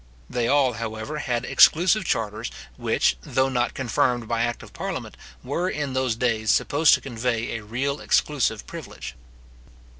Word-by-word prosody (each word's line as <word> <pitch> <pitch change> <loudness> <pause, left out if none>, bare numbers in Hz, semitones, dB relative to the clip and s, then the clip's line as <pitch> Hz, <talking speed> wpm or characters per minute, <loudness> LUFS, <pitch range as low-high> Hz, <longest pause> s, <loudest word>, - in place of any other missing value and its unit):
They 120 -1 -1
all, 135 -2 +3
however, 115 +6 -5
had 120 -4 -2
exclusive 180 +5 +5
charters, 110 -3 -2 0.3
which, - - +1
though 130 0 +1
not 125 -2 0
confirmed 120 -2 0
by 115 0 0
act 120 0 -2
of - - -14
parliament, - - -5 0.3
were 170 +8 -1
in 145 -6 -3
those 130 -3 0
days 115 -2 0
supposed 150 +1 +4
to - - -6
convey 120 -2 -2
a 115 - -5
real 135 +7 -2
exclusive 125 -7 +1
privilege. - - -8
125 Hz, 150 wpm, -24 LUFS, 115-140 Hz, 0.3 s, exclusive